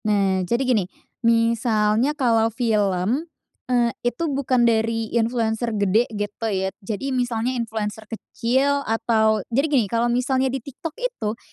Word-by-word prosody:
Nah, 195 -3 +2
jadi 240 +3 +1
gini, 240 -6 +2 0.4
misalnya 230 +2 +2
kalo 230 -4 +3
film, 220 - 0 0.4
eee, 240 -2 +2
itu 240 +6 -2
bukan 255 -3 +2
dari 225 -1 0
influencer 230 0 0
gede, 205 +4 +2
gitu 205 +1 -4
ya. 190 -1 -1
Jadi 225 +7 -3
misalnya 245 -1 -1
influencer 220 -3 -4
kecil, 265 +5 0
atau 220 -2 +2
jadi 275 +6 +2
gini, 265 -7 +3
kalo 230 +4 0
misalnya 260 +2 +1
di 265 - -2
TikTok 280 +5 -8
itu, 475 - -3
230 Hz, 135 wpm, -22 LUFS, 215-250 Hz, 0.4 s, kalo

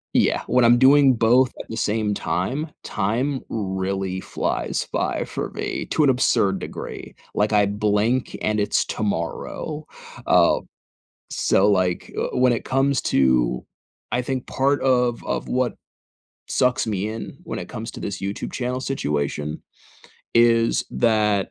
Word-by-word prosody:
Yeah, - - +3
when 125 - +3
I'm 120 +1 +6
doing 135 +1 +6
both 120 +3 +4
at - - -8
the 110 - -5
same 105 -1 0
time, 130 - -2
time 120 +7 -1
really 95 -2 -2
flies - - -2
by - - 0
for - - -4
me - - -4
to 155 - +1
an 140 - +5
absurd 100 -6 +2
degree, - - -7 0.2
like, 105 +1 +1
I 105 -1 +4
blink 105 +4 0
and 110 0 +1
it's 105 - +1
tomorrow, 110 - -3 0.4
uh, - - +5 0.7
so, 100 +2 +3
like, 90 -3 0
uh, - - -2
when 125 0 +4
it 115 - -2
comes 135 +1 +1
to 65 -2 +2 0.5
I 125 - +2
think 130 0 -3
part 140 +2 +1
of 125 -2 +2
of - - -2
what 125 -1 0 0.7
sucks 125 -1 +1
me 105 -1 -1
in 110 +1 -7
when - - -5
it - - -7
comes 110 +1 -6
to - - -9
this 100 -2 -4
YouTube 100 +1 -4
channel 125 0 -2
situation, 75 - -2 0.7
is 115 0 +4
that 105 -4 +2
110 Hz, 145 wpm, -23 LUFS, 100-125 Hz, 0.7 s, I'm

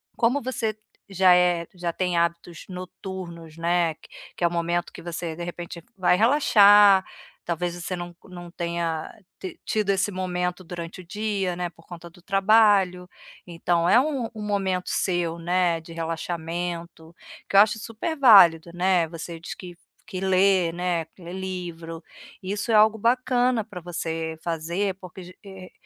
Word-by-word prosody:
como 245 +5 +2
você 240 -4 -2 0.3
já 185 -1 +5
é 175 -2 +2
já 175 -2 -3
tem 180 -2 -1
hábitos 170 0 -2
noturnos, 180 -3 -8
né, 170 -1 +1 0.4
que - - -5
é - - +5
o - - -4
momento 170 0 -1
que - - -11
você, 170 -1 -5
de 175 - -6
repente, 170 -1 -7
vai 180 -1 +3
relaxar, 205 -6 +6 0.4
talvez 175 0 -2
você 175 +1 -4
não 175 -1 -7
não 175 -2 -10
tenha 170 -2 -3 0.5
tido 215 -2 -1
esse 195 +1 +1
momento 180 -1 -3
durante 175 +1 -7
o - - -16
dia, 200 -3 -2
né, 175 -1 -3
por 165 0 -22
conta 170 -1 -10
do 175 +1 -20
trabalho. 195 -3 +3 0.4
Então 170 0 0
é 240 - +6
um 270 -5 -1
um 215 - -8
momento 190 -3 -1
seu, 175 -3 -1
né, 175 0 +1
de 165 +1 -12
relaxamento, 165 0 -5 0.3
que - - -5
eu - - +9
acho 215 +1 +3
super 230 +10 -4
válido, 175 - +7
né. 180 -2 +2
Você 165 0 -7
diz 165 - -7
que 180 -2 -10 0.3
que 185 -4 -5
lê, 190 -2 +3
né, 175 -1 -2
que 180 - -16
lê 175 +2 -8
livro, 175 -3 -6 0.4
isso 205 +4 -3
é - - +4
algo 215 +1 +6
bacana 245 0 +1
pra 200 -5 -10
você 160 -1 -4
fazer, 170 +4 -2
porque 185 0 -10
ge 180 +1 -13
eh, 190 -2 -11
180 Hz, 160 wpm, -24 LUFS, 170-195 Hz, 0.5 s, eu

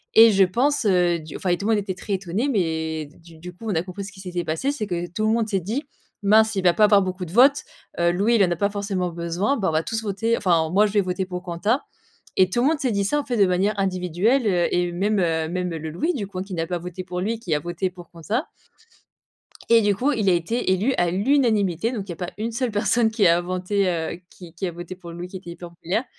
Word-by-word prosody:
Et 225 0 +9
je 195 -1 +5
pense, 250 +8 +1
heu, 180 -3 +3
du 155 -1 -10
enfin 185 - -3
et 175 - +2
tout 205 - -4
le - - +3
monde 210 - +2
était 190 -2 -3
très 200 +3 -5
étonné, 195 +6 -1
mais 160 - -1
d 145 - -18
du 165 -1 -16
du 180 +2 -9
coup 225 +6 -12
on 200 - 0
a 160 - +1
compris 185 +2 -7
ce 200 - -8
qui 190 - -15
s'était 180 -2 -4
passé. 165 - -1
C'est 215 -8 -4
que 175 -2 -2
tout 215 +2 0
le - - +3
monde 230 -1 +1
s'est 195 -3 0
dit: 225 - -3 0.4
«Mince 220 +1 +4
il 190 - -1
va 175 -1 +5
pas 215 - +5
avoir 205 -2 +5
beaucoup 185 0 -4
de 165 - -10
votes, 270 +7 +5 0.4
heu, 170 0 +3
Louis 205 +7 +1
il 205 - +5
en 180 - +2
a 175 - 0
pas 200 +4 0
forcément 195 -3 -2
besoin, 170 +10 -1
bah, 195 -8 0
on - - -1
va 155 +1 +1
tous 225 0 -3
voter 220 +2 0
enfin, 170 -7 +2
moi 205 +3 +4
je 205 - -7
vais 205 - +4
voter 185 +1 -2
pour 180 0 -6
Quentin». 200 +9 0 0.6
Et 185 -1 +5
tout 240 +6 0
le 270 - +3
monde 320 -2 0
s'est 260 -3 0
dit 200 -2 0
ça 295 +8 +1
en 290 - -2
fait, 245 -3 -2
de 200 - +5
manière 185 +4 +1
individuelle, 190 +6 +1
heu, 175 -3 +2
et 175 0 +1
même, 200 +4 0
heu, 165 -3 0
même, 180 +1 -2
heu, 165 - -3
le 160 0 -6
Louis 315 - -1
du 205 -6 -3
coup 185 -2 -7
hein, - - -2
qui 195 -2 -7
n'a 165 -1 -1
pas 175 0 -2
voté 180 +1 -7
pour 180 0 -5
lui, 225 +3 -2
qui 175 -8 -3
a 150 - +2
voté 175 +3 -3
pour 175 -2 -13
Quentin. 205 - -2 1.3
Et 230 0 +6
du 205 -1 +2
coup, 270 +9 +1
il 215 -6 0
a 185 - +5
été 185 +5 0
élu 210 +8 +1
à 175 -1 +2
l'unanimité, 215 - +1
donc 205 -5 -4
il - - -5
y - - -2
a - - -9
pas 180 +1 -5
1 225 +2 -3
seule 245 0 -1
personne 220 +2 +2
qui 220 -4 +2
a 170 +1 +5
voté 185 +2 -1
heu, 170 0 -2
qui 170 -3 -13
qui 190 +3 -3
a 175 - -3
voté 175 +2 -8
pour 170 -2 -10
Louis, 175 +1 -7
qui 190 - -8
était 180 -2 -9
hyper 170 0 -9
populaire, 180 +7 -2
190 Hz, 285 wpm, -23 LUFS, 175-215 Hz, 1.3 s, Et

